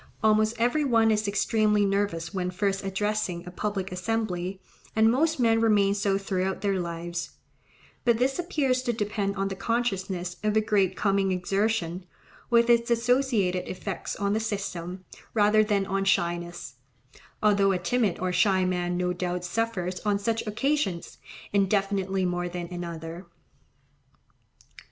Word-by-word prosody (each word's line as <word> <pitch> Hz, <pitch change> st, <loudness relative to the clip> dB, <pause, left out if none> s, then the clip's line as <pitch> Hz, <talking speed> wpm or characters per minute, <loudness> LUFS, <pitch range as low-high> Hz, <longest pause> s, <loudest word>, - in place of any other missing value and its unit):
Almost 215 Hz, +1 st, +3 dB
every 245 Hz, +6 st, +2 dB
one 225 Hz, -5 st, +3 dB
is 210 Hz, -1 st, +1 dB
extremely 210 Hz, 0 st, +2 dB
nervous 195 Hz, -4 st, -1 dB
when 180 Hz, -2 st, -1 dB
first 195 Hz, +1 st, -1 dB
addressing 195 Hz, -2 st, -2 dB
a 180 Hz, -, -8 dB
public 195 Hz, 0 st, -3 dB
assembly, 185 Hz, -1 st, -2 dB, 0.4 s
and 220 Hz, 0 st, +5 dB
most 315 Hz, +4 st, +1 dB
men 225 Hz, -2 st, +3 dB
remain 205 Hz, -3 st, +4 dB
so 200 Hz, -1 st, +1 dB
throughout 190 Hz, -1 st, -2 dB
their 200 Hz, -2 st, 0 dB
lives; 170 Hz, 0 st, -4 dB, 0.7 s
but 235 Hz, -2 st, +3 dB
this 265 Hz, +6 st, 0 dB
appears 285 Hz, -8 st, 0 dB
to 240 Hz, -2 st, -1 dB
depend 205 Hz, -2 st, -2 dB
on 195 Hz, 0 st, -1 dB
the 195 Hz, -, -4 dB
consciousness 190 Hz, -6 st, -2 dB
of 215 Hz, 0 st, +1 dB
a -, -, +5 dB
great 200 Hz, -3 st, +1 dB
coming 195 Hz, -1 st, +1 dB
exertion, 185 Hz, -1 st, -1 dB, 0.5 s
with 235 Hz, -1 st, +4 dB
its 235 Hz, 0 st, +3 dB
associated 235 Hz, -6 st, +1 dB
effects 190 Hz, 0 st, -4 dB
on 200 Hz, 0 st, 0 dB
the 215 Hz, -, +1 dB
system, 190 Hz, -4 st, -4 dB, 0.3 s
rather 215 Hz, 0 st, +5 dB
than 205 Hz, -2 st, +1 dB
on 195 Hz, +1 st, -1 dB
shyness; 175 Hz, -6 st, -1 dB, 0.7 s
although 200 Hz, -2 st, +4 dB
a 190 Hz, -, +1 dB
timid 200 Hz, +1 st, 0 dB
or 185 Hz, 0 st, -2 dB
shy 190 Hz, -1 st, +3 dB
man 175 Hz, -1 st, -1 dB
no 180 Hz, 0 st, 0 dB
doubt 180 Hz, 0 st, -3 dB
suffers 185 Hz, -2 st, -2 dB
on 205 Hz, -1 st, +1 dB
such 225 Hz, +2 st, -1 dB
occasions 215 Hz, -, -1 dB, 0.3 s
infinitely 195 Hz, -1 st, +1 dB
more 175 Hz, 0 st, -1 dB
than 175 Hz, 0 st, -5 dB
another. 170 Hz, 0 st, -6 dB
200 Hz, 145 wpm, -27 LUFS, 180-220 Hz, 0.7 s, and